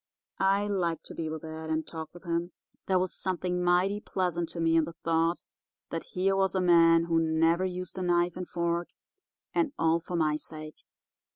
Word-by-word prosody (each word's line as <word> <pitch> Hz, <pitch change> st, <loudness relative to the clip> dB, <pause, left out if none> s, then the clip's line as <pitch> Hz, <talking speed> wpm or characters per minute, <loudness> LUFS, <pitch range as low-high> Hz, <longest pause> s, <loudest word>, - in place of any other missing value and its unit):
I 195 Hz, +1 st, +3 dB
liked 180 Hz, -5 st, -1 dB
to -, -, -9 dB
be 160 Hz, -1 st, -3 dB
with 160 Hz, 0 st, -6 dB
Ed 160 Hz, 0 st, -6 dB
and 160 Hz, 0 st, 0 dB
talk 160 Hz, -1 st, -7 dB
with 175 Hz, -, -14 dB
him. 170 Hz, 0 st, -2 dB, 0.3 s
There 190 Hz, -, +3 dB
was 185 Hz, 0 st, 0 dB
something 180 Hz, -1 st, -2 dB
mighty 180 Hz, +3 st, +3 dB
pleasant 175 Hz, -4 st, -1 dB
to 170 Hz, -, -6 dB
me 165 Hz, 0 st, +3 dB
in 165 Hz, -1 st, +4 dB
the 165 Hz, +1 st, -9 dB
thought 165 Hz, +1 st, +1 dB, 0.5 s
that 165 Hz, -, -3 dB
here 190 Hz, +1 st, +2 dB
was 195 Hz, 0 st, +1 dB
a -, -, +3 dB
man 165 Hz, -2 st, +6 dB
who 165 Hz, -1 st, +2 dB
never 165 Hz, +3 st, +2 dB
used 185 Hz, 0 st, -4 dB
a -, -, -3 dB
knife 175 Hz, -1 st, +2 dB
and 180 Hz, -1 st, -5 dB
fork, 170 Hz, 0 st, -1 dB, 0.7 s
and 310 Hz, -4 st, +1 dB
all 165 Hz, +1 st, +3 dB
for 175 Hz, +2 st, -6 dB
my 155 Hz, -2 st, +2 dB
sake. 155 Hz, 0 st, -8 dB
170 Hz, 195 wpm, -29 LUFS, 165-180 Hz, 0.7 s, man